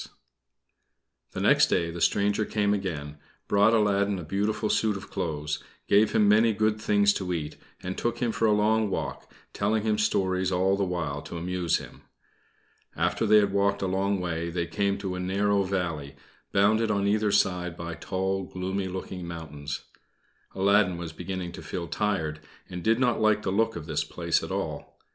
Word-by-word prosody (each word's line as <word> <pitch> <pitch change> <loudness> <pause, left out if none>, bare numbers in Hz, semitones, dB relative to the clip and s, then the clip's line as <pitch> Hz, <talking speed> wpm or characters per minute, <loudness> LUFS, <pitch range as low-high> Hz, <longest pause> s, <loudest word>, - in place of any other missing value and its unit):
The - - -4
next - - +5
day 85 -2 0
the 85 0 -7
stranger 105 +1 +2
came 105 -1 +1
again, 75 -7 -4 0.3
brought 105 +3 +4
Aladdin 100 -2 +2
a 90 - -6
beautiful 105 +6 -1
suit 105 -1 +1
of 100 - -11
clothes, 75 -2 -3 0.2
gave 105 +2 +4
him 105 - +4
many 110 +2 +5
good 110 0 0
things 100 -1 +3
to 95 -3 -3
eat, 75 -3 -4 0.3
and 95 +1 -3
took 120 0 -1
him 120 -1 0
for 115 - +1
a - - +4
long 105 +1 +2
walk, - - -4 0.2
telling 105 +1 0
him 110 -1 +1
stories 95 -3 +1
all 95 +2 +2
the 100 - 0
while 80 -6 -2
to 85 - -7
amuse 90 0 0
him. - - -11 0.9
After 115 - 0
they 105 +1 +7
had 100 -2 +3
walked 100 0 +1
a - - +1
long 95 +1 0
way, 85 -1 -2
they 85 0 -2
came 100 +2 0
to 95 -2 -4
a 90 - -4
narrow 100 +2 +1
valley, 85 -7 -3 0.4
bounded 110 +3 +3
on 100 -1 +1
either 105 +1 +2
side 90 -3 +1
by 85 0 -5
tall, 95 +3 -2
gloomy 95 +1 -3
looking 90 -1 -6
mountains. 75 -4 -6 0.7
Aladdin 100 -1 +3
was 85 -2 -6
beginning 90 +1 -5
to - - -9
feel 85 -2 -5
tired, 80 -7 -1 0.3
and 90 - -7
he - - -5
did 115 +5 +2
not 125 -3 +2
like 110 -1 +3
the 95 - -1
look 110 +3 +1
of 80 - -6
this 75 -2 -1
place - - -1
at - - -6
all. - - -4
95 Hz, 185 wpm, -27 LUFS, 90-105 Hz, 0.9 s, they